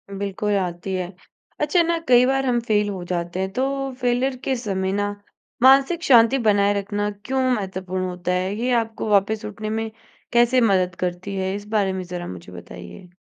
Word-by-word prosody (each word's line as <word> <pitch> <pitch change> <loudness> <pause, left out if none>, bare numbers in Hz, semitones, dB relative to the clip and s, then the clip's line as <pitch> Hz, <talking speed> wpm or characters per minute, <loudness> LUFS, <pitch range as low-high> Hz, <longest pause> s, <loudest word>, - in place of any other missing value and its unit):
बिल्कुल 200 +1 -2
आती 180 0 -3
है। 180 0 -4 0.5
अच्छा 300 +4 +3
ना, 335 0 0
कई 245 0 +6
बार 270 +1 +1
हम 245 -2 +2
फ़ेल 210 -1 +2
हो 190 -3 -5
जाते 175 +1 -2
हैं 190 0 -2
तो 255 +4 0 0.4
फ़ेलियर 250 +2 +1
के 265 - 0
समय 195 -6 -2
ना 205 0 0 0.5
मानसिक 275 +6 +5
शांति 240 -2 +6
बनाए 200 -1 +4
रखना 205 +1 -2 0.2
क्यों 265 0 0
महत्वपूर्ण 190 -4 -3
होता 180 0 -3
है? 185 +2 -1
ये 240 +4 -1
आपको 225 -1 -5
वापस 205 +1 +2
उठने 215 +1 -5
में 220 +1 -2 0.4
कैसे 240 +1 +4
मदद 185 -5 +2
करती 180 +2 -3
है 190 0 -1
इस 205 0 -8
बारे 205 -3 +1
में 190 0 -4
ज़रा 175 0 -6
मुझे 90 0 -9
बताइए? 85 - -11
205 Hz, 180 wpm, -22 LUFS, 185-240 Hz, 0.5 s, कई